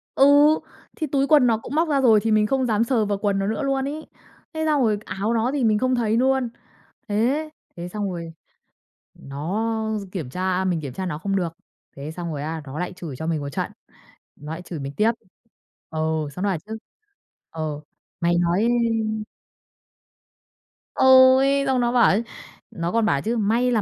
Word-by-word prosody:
Ừ, 270 Hz, -, +6 dB, 0.7 s
thì 310 Hz, -, -3 dB
túi 275 Hz, 0 st, +1 dB
quần 290 Hz, -5 st, +5 dB
nó 225 Hz, -2 st, +3 dB
cũng 225 Hz, -, -7 dB
móc 320 Hz, +1 st, +2 dB
ra 280 Hz, -2 st, +2 dB
rồi, 225 Hz, -4 st, +6 dB
thì 225 Hz, -, +1 dB
mình 215 Hz, 0 st, +3 dB
không 265 Hz, +2 st, +1 dB
dám 220 Hz, -1 st, +2 dB
sờ 230 Hz, -2 st, +1 dB
vào 205 Hz, -1 st, -1 dB
quần 200 Hz, -1 st, 0 dB
nó 195 Hz, -, -1 dB
nữa 220 Hz, +8 st, -2 dB
luôn 270 Hz, -1 st, 0 dB
ấy. 310 Hz, +2 st, -6 dB, 0.5 s
Thế 315 Hz, 0 st, -2 dB
xong 300 Hz, -3 st, +2 dB
rồi 215 Hz, -3 st, +2 dB
áo 200 Hz, +5 st, -2 dB
nó 235 Hz, +3 st, +1 dB
thì 280 Hz, -, 0 dB
mình 215 Hz, -2 st, +3 dB
không 255 Hz, 0 st, +1 dB
thấy 225 Hz, -1 st, +1 dB
luôn. 265 Hz, -1 st, +2 dB, 0.6 s
Thế, 255 Hz, +9 st, 0 dB, 0.3 s
thế 175 Hz, +1 st, -6 dB
xong 205 Hz, +1 st, -3 dB
rồi 170 Hz, -2 st, -6 dB, 0.8 s
nó 220 Hz, +10 st, -3 dB
kiểm 160 Hz, -10 st, -5 dB
tra 185 Hz, +4 st, -1 dB
mình 180 Hz, -3 st, 0 dB
kiểm 140 Hz, -4 st, -6 dB
tra 185 Hz, +7 st, -4 dB
nó 150 Hz, -3 st, -3 dB
không 195 Hz, +3 st, -2 dB
được, 180 Hz, -3 st, 0 dB, 0.5 s
thế 140 Hz, +2 st, -6 dB
xong 170 Hz, 0 st, -5 dB
rồi 145 Hz, -1 st, -4 dB
á, 160 Hz, +1 st, -4 dB
nó 135 Hz, +3 st, -7 dB
lại 180 Hz, +1 st, -3 dB
chửi 170 Hz, -7 st, -8 dB
cho 160 Hz, -, -5 dB
mình 160 Hz, -3 st, -1 dB
một 140 Hz, -, -5 dB
trận, -, -, -3 dB, 0.6 s
nó 150 Hz, +2 st, -9 dB
lại 165 Hz, -, -5 dB
chửi 170 Hz, -3 st, -7 dB
mình 140 Hz, +1 st, -6 dB
tiếp. 220 Hz, +2 st, +4 dB, 0.8 s
Ừ, 160 Hz, -, -5 dB, 0.3 s
xong 180 Hz, -, -5 dB
nó 205 Hz, -, +1 dB
bảo 190 Hz, -, 0 dB
chứ, 220 Hz, +1 st, -5 dB, 0.7 s
ừ, 155 Hz, -2 st, -4 dB, 0.4 s
"Mày 170 Hz, 0 st, +2 dB
nói" 175 Hz, +6 st, +2 dB, 2.3 s
Ôi, 265 Hz, +1 st, +6 dB
xong 260 Hz, -2 st, +1 dB
nó 240 Hz, -, +1 dB
bảo 245 Hz, -1 st, +5 dB
ấy, 215 Hz, +4 st, +2 dB, 0.5 s
nó 170 Hz, +1 st, -3 dB
còn 230 Hz, -1 st, +2 dB
bảo 140 Hz, -9 st, +1 dB
chứ: 230 Hz, +6 st, -1 dB
"May 230 Hz, +4 st, +1 dB
là 225 Hz, -3 st, +2 dB
215 Hz, 195 wpm, -23 LUFS, 170-250 Hz, 2.3 s, Ừ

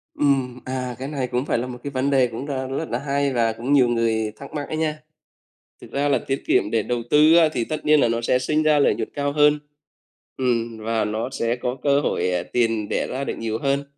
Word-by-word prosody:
Ừm, 135 Hz, -4 st, +1 dB
à, 130 Hz, -1 st, -3 dB
cái 135 Hz, -, -4 dB
này 140 Hz, -3 st, -3 dB
cũng 125 Hz, +3 st, -2 dB
phải -, -, 0 dB
là 125 Hz, +2 st, -2 dB
một 125 Hz, -1 st, -7 dB
cái 140 Hz, -, -4 dB
vấn 135 Hz, +1 st, 0 dB
đề 130 Hz, -3 st, +3 dB
cũng 115 Hz, +4 st, -6 dB
đang 135 Hz, -1 st, -3 dB
rất 160 Hz, -, -4 dB
là -, -, -1 dB
hay 140 Hz, -1 st, 0 dB
và 115 Hz, -2 st, +1 dB
cũng 120 Hz, +5 st, -2 dB
nhiều 130 Hz, -4 st, +5 dB
người 115 Hz, -2 st, 0 dB
thắc 140 Hz, +5 st, -11 dB
mắc 145 Hz, -2 st, -4 dB
ấy 155 Hz, -, -4 dB
nha, 155 Hz, -1 st, -1 dB, 0.8 s
thực -, -, -13 dB
ra 140 Hz, +1 st, 0 dB
là 135 Hz, -, +3 dB
tiết 135 Hz, 0 st, -2 dB
kiệm 105 Hz, -, +2 dB
để 110 Hz, -2 st, +1 dB
đầu 120 Hz, +1 st, -2 dB
tư 155 Hz, +2 st, +6 dB
á, 165 Hz, -2 st, +5 dB
thì 115 Hz, -, -1 dB
tất 155 Hz, +4 st, -5 dB
nhiên 150 Hz, 0 st, +5 dB
là -, -, +4 dB
nó 115 Hz, 0 st, -1 dB
sẽ 125 Hz, +2 st, +2 dB
sinh 150 Hz, +4 st, 0 dB
ra 155 Hz, -1 st, +4 dB
lợi 140 Hz, -, +3 dB
nhuận -, -, -4 dB
cao 145 Hz, 0 st, -1 dB
hơn, 150 Hz, 0 st, +4 dB, 0.8 s
ừm, 115 Hz, -3 st, -1 dB
và 110 Hz, 0 st, -1 dB
nó 110 Hz, +3 st, -2 dB
sẽ 115 Hz, -2 st, -1 dB
có 125 Hz, +1 st, -3 dB
cơ 140 Hz, 0 st, +3 dB
hội, -, -, 0 dB
ờ, 90 Hz, -1 st, -1 dB
tiền 115 Hz, -3 st, +1 dB
đẻ -, -, -1 dB
ra 130 Hz, +2 st, -4 dB
được -, -, -3 dB
nhiều 110 Hz, -1 st, -2 dB
hơn, 140 Hz, 0 st, 0 dB
130 Hz, 255 wpm, -23 LUFS, 115-145 Hz, 0.8 s, tư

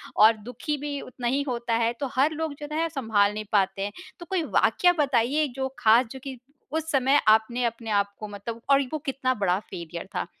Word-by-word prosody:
और 220 Hz, +2 st, +7 dB
दुखी 250 Hz, +7 st, -4 dB
भी 285 Hz, 0 st, -4 dB
उतना 250 Hz, -1 st, -5 dB
ही 270 Hz, +3 st, +1 dB
होता 235 Hz, -2 st, -2 dB
है। 230 Hz, +1 st, +1 dB
तो 280 Hz, -, -1 dB
हर 280 Hz, +4 st, +3 dB
लोग 315 Hz, -1 st, -3 dB
जो 295 Hz, -, -6 dB
है, 330 Hz, +1 st, +1 dB
सँभाल 220 Hz, -8 st, +1 dB
नहीं 215 Hz, 0 st, -5 dB
पाते 195 Hz, -1 st, +1 dB
हैं। 205 Hz, -, -2 dB, 0.3 s
तो 345 Hz, -, -8 dB
कोई 350 Hz, -1 st, -1 dB
वाक़या 355 Hz, +3 st, +3 dB
बताइए, 280 Hz, +2 st, +2 dB
जो 265 Hz, 0 st, -1 dB
ख़ास 235 Hz, +2 st, +5 dB
जो 265 Hz, -, -7 dB
कि 265 Hz, -2 st, -6 dB, 0.4 s
उस 320 Hz, 0 st, -2 dB
समय 270 Hz, +1 st, +4 dB
आपने 220 Hz, +3 st, +4 dB
अपने 230 Hz, -1 st, -3 dB
आप 200 Hz, -1 st, +1 dB
को 215 Hz, -, -5 dB
मतलब 215 Hz, +3 st, -7 dB
और 275 Hz, 0 st, +6 dB
वो -, -, +1 dB
कितना 265 Hz, -1 st, 0 dB
बड़ा 195 Hz, -4 st, +1 dB
फ़ेलियर 170 Hz, -4 st, -8 dB
था? -, -, -1 dB
245 Hz, 215 wpm, -26 LUFS, 215-285 Hz, 0.4 s, और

